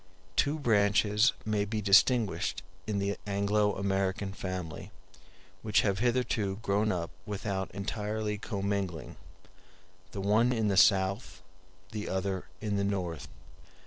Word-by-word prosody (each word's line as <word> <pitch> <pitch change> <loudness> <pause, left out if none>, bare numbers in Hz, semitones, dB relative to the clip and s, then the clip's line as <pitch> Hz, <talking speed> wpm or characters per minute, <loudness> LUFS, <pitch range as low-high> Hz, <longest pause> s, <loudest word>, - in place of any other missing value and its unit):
Two 145 +2 +2
branches 105 -2 +3
may 105 -1 +1
be 105 +1 -2
distinguished 105 +1 +3 0.2
in 105 -2 -1
the 100 0 -1
Anglo 105 +1 +1
American 95 0 -1
family, 90 -5 -5 0.7
which 105 -1 +3
have 100 -2 0
hitherto 120 -5 0
grown 105 +2 +1
up 85 -2 -3 0.2
without 100 -2 -3
entirely 105 +1 -3
commingling; 100 -5 -3 1.0
the - - -6
one 110 +5 +3
in 110 -3 +1
the 100 - +1
South, 95 +1 +3 0.5
the 105 -1 -4
other 95 0 -2 0.2
in 105 -2 -1
the 100 - +1
North. 90 -5 -2
100 Hz, 120 wpm, -30 LUFS, 95-105 Hz, 1.0 s, branches